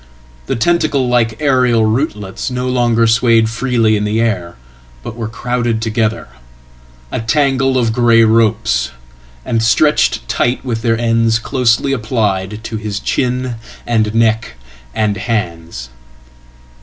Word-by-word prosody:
Thetentacle 145 Hz, 0 st, +1 dB
like 115 Hz, -3 st, +1 dB
aerial 125 Hz, -6 st, +2 dB
rootlets 110 Hz, -3 st, -2 dB
no 125 Hz, 0 st, -3 dB
longer 120 Hz, -2 st, +2 dB
swayed 115 Hz, -1 st, +3 dB
freely 115 Hz, -2 st, +1 dB
in 105 Hz, -, -1 dB
the 105 Hz, +2 st, 0 dB
air, 95 Hz, -7 st, -1 dB, 0.5 s
but 115 Hz, -, -7 dB
werecrowded 115 Hz, +1 st, -2 dB
together, 115 Hz, 0 st, -1 dB, 0.8 s
a -, -, -2 dB
tangle 135 Hz, +1 st, +1 dB
of 115 Hz, -3 st, +1 dB
grey 115 Hz, -1 st, +4 dB
ropes, 110 Hz, -, +2 dB, 0.6 s
and 115 Hz, -, 0 dB
stretched 130 Hz, +7 st, +2 dB
tight, 125 Hz, +2 st, -1 dB
with 115 Hz, -3 st, -2 dB
theirends 115 Hz, 0 st, +1 dB
closely 125 Hz, +2 st, +1 dB
applied 105 Hz, -4 st, -2 dB
to 115 Hz, -1 st, -5 dB
his 105 Hz, -1 st, -4 dB
chin 125 Hz, 0 st, -2 dB, 0.3 s
and 110 Hz, -2 st, 0 dB
neck 115 Hz, -1 st, +1 dB, 0.4 s
and 105 Hz, -2 st, 0 dB
hands. 85 Hz, -, -4 dB
115 Hz, 120 wpm, -15 LUFS, 110-125 Hz, 0.8 s, grey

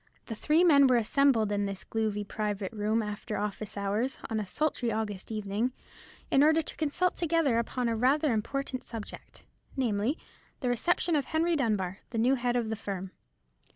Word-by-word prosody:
The 230 Hz, -, -5 dB
three 305 Hz, +10 st, +3 dB
men 285 Hz, -6 st, +7 dB
were 255 Hz, -, +4 dB
assembled 230 Hz, -2 st, +3 dB
in 205 Hz, 0 st, 0 dB
this 195 Hz, -1 st, -5 dB
gloomy 215 Hz, -2 st, -1 dB
private 205 Hz, -2 st, -3 dB
room 215 Hz, +1 st, 0 dB
after 210 Hz, +1 st, -4 dB
office 205 Hz, 0 st, -4 dB
hours, 205 Hz, +6 st, -1 dB
on 220 Hz, -, 0 dB
a 210 Hz, -, -4 dB
sultry 255 Hz, 0 st, -1 dB
August 215 Hz, -2 st, -3 dB
evening, 215 Hz, +3 st, -1 dB, 0.6 s
in 275 Hz, -, +5 dB
order 315 Hz, +2 st, +5 dB
to -, -, -5 dB
consult 325 Hz, +4 st, 0 dB
together 325 Hz, -8 st, +2 dB
upon 245 Hz, +1 st, -1 dB
rather 260 Hz, +7 st, +2 dB
an -, -, +2 dB
important 255 Hz, +4 st, -2 dB
subject, 225 Hz, -3 st, -9 dB, 0.3 s
namely, 235 Hz, +3 st, 0 dB, 0.4 s
the 250 Hz, -, 0 dB
reception 335 Hz, +7 st, +1 dB
of 285 Hz, -3 st, +1 dB
Henry 330 Hz, +2 st, +1 dB
Dunbar, 205 Hz, -, 0 dB
the 235 Hz, -, -5 dB
new 245 Hz, +4 st, +4 dB
head 245 Hz, -2 st, 0 dB
of 235 Hz, -3 st, 0 dB
the 220 Hz, -, -1 dB
firm. 195 Hz, -3 st, -5 dB
230 Hz, 175 wpm, -29 LUFS, 210-275 Hz, 0.6 s, men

